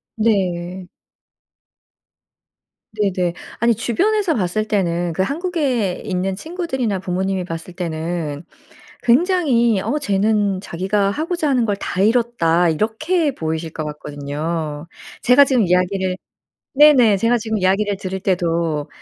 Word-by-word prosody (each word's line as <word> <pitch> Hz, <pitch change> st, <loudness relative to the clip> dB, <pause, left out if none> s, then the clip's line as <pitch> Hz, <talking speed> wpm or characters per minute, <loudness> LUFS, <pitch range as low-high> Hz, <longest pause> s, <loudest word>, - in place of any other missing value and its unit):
네. 185 Hz, -4 st, -1 dB, 2.1 s
네네. 185 Hz, -4 st, 0 dB, 0.3 s
아니 235 Hz, 0 st, +3 dB
주변에서 370 Hz, -, +1 dB
봤을 215 Hz, -2 st, -1 dB
때는 175 Hz, -4 st, 0 dB
그 175 Hz, -, -1 dB
한국에 275 Hz, -, -1 dB
있는 185 Hz, 0 st, -2 dB
친구들이나 265 Hz, -, -3 dB
부모님이 190 Hz, +1 st, -2 dB
봤을 165 Hz, 0 st, -7 dB
때는 165 Hz, -3 st, -4 dB, 0.6 s
굉장히 245 Hz, -, +3 dB
"어 290 Hz, +9 st, -1 dB
쟤는 205 Hz, -4 st, +1 dB
자기가 195 Hz, +2 st, -1 dB
하고자 320 Hz, -, -2 dB
하는 255 Hz, -3 st, +2 dB
걸 205 Hz, -2 st, -1 dB
다 185 Hz, -, -3 dB
이뤘다." 205 Hz, -7 st, +2 dB
이렇게 285 Hz, -, 0 dB
보이실 160 Hz, -3 st, -3 dB
것 155 Hz, -1 st, -5 dB
같거든요. 150 Hz, +1 st, -5 dB, 0.3 s
제가 250 Hz, +3 st, +6 dB
지금 260 Hz, -4 st, +2 dB
이야기를 185 Hz, +1 st, +1 dB, 0.6 s
네네. 265 Hz, -8 st, +6 dB
제가 230 Hz, +5 st, +2 dB
지금 220 Hz, -1 st, -2 dB
이야기를 195 Hz, +2 st, +1 dB
들을 190 Hz, 0 st, -5 dB
때도 170 Hz, -5 st, 0 dB
195 Hz, 265 characters per minute, -20 LUFS, 175-240 Hz, 2.1 s, 제가